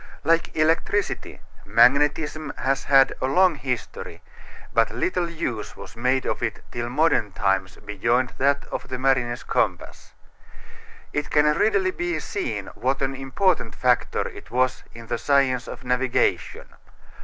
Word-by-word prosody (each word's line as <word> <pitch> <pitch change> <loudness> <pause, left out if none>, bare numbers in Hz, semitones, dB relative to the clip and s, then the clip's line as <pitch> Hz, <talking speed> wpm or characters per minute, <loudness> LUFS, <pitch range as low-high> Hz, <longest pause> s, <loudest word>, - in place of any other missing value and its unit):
Like 165 0 +1
electricity, 165 +6 0 0.2
magnetism 150 +3 +3
has 135 +1 -1
had 135 -1 +5
a 130 - +1
long 180 +6 +4
history, 130 -4 -5 0.5
but 115 0 +3
little 180 -2 -1
use 120 -10 -4
was - - -11
made 125 +3 0
of - - -2
it 115 -3 -2
till 120 0 -4
modern 130 - +1
times 95 -1 0
beyond 115 +5 -1
that 140 +1 +2
of - - -4
the 130 - -4
mariner's 130 -2 +1
compass. - - -2 1.0
It 145 0 -2
can 150 0 +3
readily 370 - +2
be 350 -1 -2
seen 390 -5 -4
what 135 +2 -1
an 135 0 -1
important 135 - 0
factor 125 -1 +1
it - - -12
was 130 +2 0
in 115 0 -11
the 120 0 -3
science 135 -4 +2
of - - -8
navigation. 125 0 0
135 Hz, 140 wpm, -24 LUFS, 120-155 Hz, 1.0 s, had